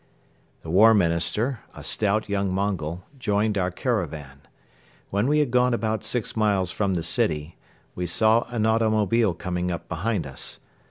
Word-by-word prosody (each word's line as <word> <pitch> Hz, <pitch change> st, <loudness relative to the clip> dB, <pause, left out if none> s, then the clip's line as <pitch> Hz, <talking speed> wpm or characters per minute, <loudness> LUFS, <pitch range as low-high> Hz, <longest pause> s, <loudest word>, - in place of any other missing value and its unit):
The 80 Hz, -, -6 dB
War 110 Hz, +5 st, +7 dB
Minister, 90 Hz, +7 st, +1 dB, 0.2 s
a -, -, -9 dB
stout, 105 Hz, 0 st, 0 dB
young 100 Hz, -1 st, -1 dB
Mongol, 90 Hz, -3 st, -2 dB, 0.2 s
joined 105 Hz, -2 st, +1 dB
our 90 Hz, -2 st, +1 dB
caravan. 80 Hz, -, -3 dB, 0.7 s
When 100 Hz, +5 st, +1 dB
we 150 Hz, +2 st, +3 dB
had 150 Hz, -5 st, +1 dB
gone 125 Hz, 0 st, +3 dB
about 110 Hz, -1 st, -2 dB
six 115 Hz, +1 st, -2 dB
miles 100 Hz, -5 st, +1 dB
from 100 Hz, -3 st, 0 dB
the 85 Hz, -, -2 dB
city, 80 Hz, -1 st, -1 dB, 0.4 s
we 90 Hz, 0 st, -3 dB
saw 110 Hz, +7 st, +3 dB
an 115 Hz, -3 st, -1 dB
automobile 110 Hz, -2 st, +2 dB
coming 90 Hz, 0 st, -3 dB
up 85 Hz, -1 st, -5 dB
behind 95 Hz, +1 st, -2 dB
us. 70 Hz, -1 st, -6 dB
100 Hz, 155 wpm, -25 LUFS, 85-110 Hz, 0.7 s, War